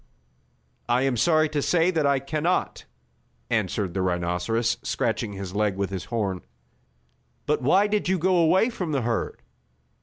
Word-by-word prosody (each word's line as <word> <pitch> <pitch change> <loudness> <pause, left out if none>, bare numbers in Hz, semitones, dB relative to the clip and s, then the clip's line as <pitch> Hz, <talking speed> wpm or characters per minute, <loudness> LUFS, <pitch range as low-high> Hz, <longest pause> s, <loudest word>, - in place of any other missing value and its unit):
"I 120 +2 +3
am 135 -2 +1
sorry 155 +6 +3
to 150 -1 -1
say 175 +4 +2
that 160 -5 +1
I 140 -1 +3
can 145 +3 -3
not," 175 +4 -1 0.7
answered 95 -4 -1
the 95 - -1
rhinoceros, 90 +6 0
scratching 115 -4 -2
his 95 -2 -6
leg 105 -1 0
with 100 0 -2
his 95 -2 -4
horn. 100 -6 -2 1.0
"But 150 -1 0
why 185 +10 +4
did 210 -3 0
you 190 - +2
go 185 +2 +2
away 180 +8 +3
from 180 -8 -4
the 135 - +1
herd?" 115 0 -2
130 Hz, 160 wpm, -25 LUFS, 100-165 Hz, 1.0 s, why